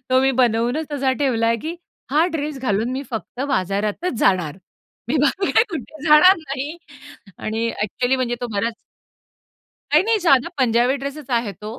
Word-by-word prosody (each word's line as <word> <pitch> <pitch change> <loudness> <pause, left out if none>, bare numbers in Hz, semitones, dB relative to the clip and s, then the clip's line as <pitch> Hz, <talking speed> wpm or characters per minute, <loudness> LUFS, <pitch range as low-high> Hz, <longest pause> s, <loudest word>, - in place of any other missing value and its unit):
तो 255 - +5
मी 270 0 +3
बनवूनच 245 +6 +1
असा 270 -2 +1
ठेवलाय, 230 -4 +1
की 320 +9 -6 0.3
हा 310 +4 +3
ड्रेस 300 -2 -3
घालून 225 -1 0
मी 265 - -3
फक्त 230 +2 -6
बाजारातच 205 - -1
जाणार. 180 -7 +1 0.5
मी 295 - +1
बाकी 380 +6 +1 0.2
कुठे 310 -1 -7
जाणार 315 +5 +7
नाही 285 +1 -5 0.6
आणि 225 +2 -2
ॲक्चुअली 245 +5 0
म्हणजे 250 -2 -1
तो 245 - -2
बराच 225 +3 -1 1.2
नाही, 305 - +6
नाही 450 0 +2
साधा 275 -5 +4
पंजाबी 245 +1 +3
ड्रेसच 280 0 -6
आहे 235 -4 0
तो. 215 +6 -9
260 Hz, 155 wpm, -21 LUFS, 230-300 Hz, 1.2 s, जाणार